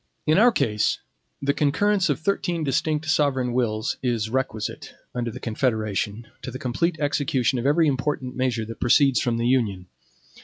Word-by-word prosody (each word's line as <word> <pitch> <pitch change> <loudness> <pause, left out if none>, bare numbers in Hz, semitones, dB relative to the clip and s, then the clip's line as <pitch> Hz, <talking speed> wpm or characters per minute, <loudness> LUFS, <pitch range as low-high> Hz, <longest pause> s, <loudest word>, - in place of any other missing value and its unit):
In 155 +4 +4
our 240 +3 +6
case, 105 - +1 0.5
the 140 +1 +2
concurrence 185 +7 +2
of 145 - 0
thirteen 175 -2 -1
distinct 150 +2 0
sovereign 140 -5 +1
wills 110 -3 0
is 115 -4 -1
requisite, 120 -5 -3 0.2
under 120 -1 -2
the 120 +3 -8
Confederation, 110 -2 -1 0.2
to - - -6
the 130 - -6
complete 155 +7 -1
execution 140 -4 +1
of 125 - -1
every 160 +3 +4
important 135 -2 -1
measure 125 -3 -1
that 115 +1 -9
proceeds 135 +2 +4
from 120 -2 0
the 115 - -1
Union. 110 -8 +1
130 Hz, 160 wpm, -24 LUFS, 115-150 Hz, 0.5 s, our